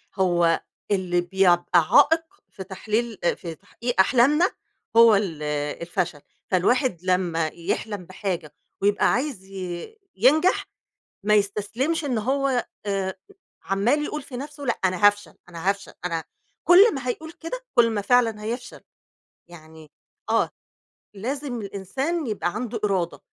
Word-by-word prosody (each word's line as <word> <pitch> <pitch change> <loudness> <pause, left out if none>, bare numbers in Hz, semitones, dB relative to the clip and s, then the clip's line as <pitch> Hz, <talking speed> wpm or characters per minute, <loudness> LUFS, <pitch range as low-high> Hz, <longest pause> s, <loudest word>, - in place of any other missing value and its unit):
هو 175 -3 +2 0.3
اللي 180 -3 +1
بيع 185 0 +4
يبقى 175 0 +3
عائق 325 +3 +6 0.3
في 190 - -8
تحليل 215 +3 -3
آآ 175 - +2
في 165 -2 -7
تحقيق 235 +5 -5
أحلامنا 275 - +4 0.5
هو 230 -2 +8
ال 175 -7 -2 0.4
الفشَل، 170 -3 -2 0.3
فالواحد 195 - +2
لما 175 -3 +1
يحلَم 180 +4 -4
بحاجة 185 -4 -4 0.3
ويبقى 205 +1 +3
عايز 255 -6 -2
ي 190 - -7 0.2
ينجَح 305 - +3 0.6
ما 210 0 +4
يستسلمش 215 +10 0
إن 255 -6 0
هو 265 +2 0 0.2
آآ 195 -1 -1 0.5
عَمّال 230 +10 +1
يقول 300 0 -4
في 265 -2 -9
نَفسه، 285 +2 -7
لأ 240 - 0
أنا 185 +2 +4
هافشل، 205 0 +1
أنا 170 +2 -4
هافشل، 200 0 -5
أنا 165 -2 -2 0.4
كلّ 385 +4 +7
ما 260 -2 -4
هيقول 315 +6 -4
كده، 335 +9 -6
كلّ 235 -2 +5
ما 215 -2 -1
فعلًا 225 -2 +2
هيفشَل، 235 +3 -5 0.7
يعني 160 -2 -14 0.4
آه - - +2 0.6
لازم 250 +3 -4
الإنسان 260 - -3
يبقى 200 -5 -2
عنده 230 0 -3
إرادة، 190 -5 -1
205 Hz, 135 wpm, -24 LUFS, 185-255 Hz, 0.7 s, هو